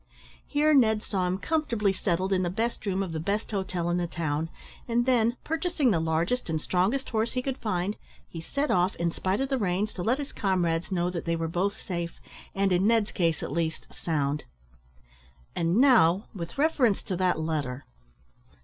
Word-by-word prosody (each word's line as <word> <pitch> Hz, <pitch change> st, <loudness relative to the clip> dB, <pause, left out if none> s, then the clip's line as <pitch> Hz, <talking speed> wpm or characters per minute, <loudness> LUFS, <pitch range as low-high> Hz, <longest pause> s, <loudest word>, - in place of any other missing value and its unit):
Here 300 Hz, +1 st, +3 dB
Ned 220 Hz, -6 st, +4 dB
saw 185 Hz, -3 st, -1 dB
him 180 Hz, +1 st, 0 dB
comfortably 230 Hz, -7 st, 0 dB
settled 190 Hz, 0 st, 0 dB
in 185 Hz, -, +2 dB
the 175 Hz, -, 0 dB
best 220 Hz, +3 st, -2 dB
room 195 Hz, 0 st, +1 dB
of 185 Hz, -, -5 dB
the 160 Hz, -, -3 dB
best 200 Hz, +8 st, -2 dB
hotel 185 Hz, -4 st, -2 dB
in 175 Hz, -, +1 dB
the 175 Hz, -1 st, -1 dB
town, 160 Hz, -1 st, -2 dB, 0.4 s
and 240 Hz, 0 st, +1 dB
then, 240 Hz, -1 st, +2 dB
purchasing 325 Hz, -5 st, +1 dB
the 170 Hz, -, +2 dB
largest 165 Hz, +8 st, 0 dB
and 160 Hz, -1 st, 0 dB
strongest 190 Hz, -, 0 dB
horse 225 Hz, 0 st, 0 dB
he 255 Hz, -, 0 dB
could 270 Hz, -1 st, -3 dB
find, 205 Hz, -2 st, -1 dB, 0.3 s
he 165 Hz, -, -7 dB
set 280 Hz, -, -1 dB
off, 180 Hz, +1 st, +2 dB
in 170 Hz, 0 st, 0 dB
spite 190 Hz, +7 st, -1 dB
of 270 Hz, -, -1 dB
the 270 Hz, -2 st, 0 dB
rains, 200 Hz, +1 st, 0 dB
to 180 Hz, -, -5 dB
let 230 Hz, +8 st, +2 dB
his 285 Hz, -1 st, -6 dB
comrades 175 Hz, -4 st, 0 dB
know 175 Hz, -1 st, 0 dB
that 170 Hz, -2 st, -4 dB
they 170 Hz, 0 st, +1 dB
were 165 Hz, 0 st, -2 dB
both 190 Hz, +6 st, -1 dB
safe, 170 Hz, -2 st, -4 dB, 0.4 s
and, 195 Hz, 0 st, +2 dB
in 180 Hz, +3 st, +3 dB
Ned's 225 Hz, -2 st, +3 dB
case 165 Hz, -4 st, 0 dB
at -, -, -4 dB
least, 160 Hz, 0 st, -2 dB
sound. 150 Hz, -3 st, -1 dB, 1.1 s
"And, 170 Hz, +2 st, +1 dB
now, 225 Hz, -8 st, +5 dB
with 170 Hz, 0 st, -7 dB
reference 275 Hz, -8 st, +2 dB
to 185 Hz, -, -3 dB
that 180 Hz, -3 st, +1 dB
letter." 145 Hz, -5 st, -2 dB
190 Hz, 195 wpm, -27 LUFS, 170-230 Hz, 1.1 s, now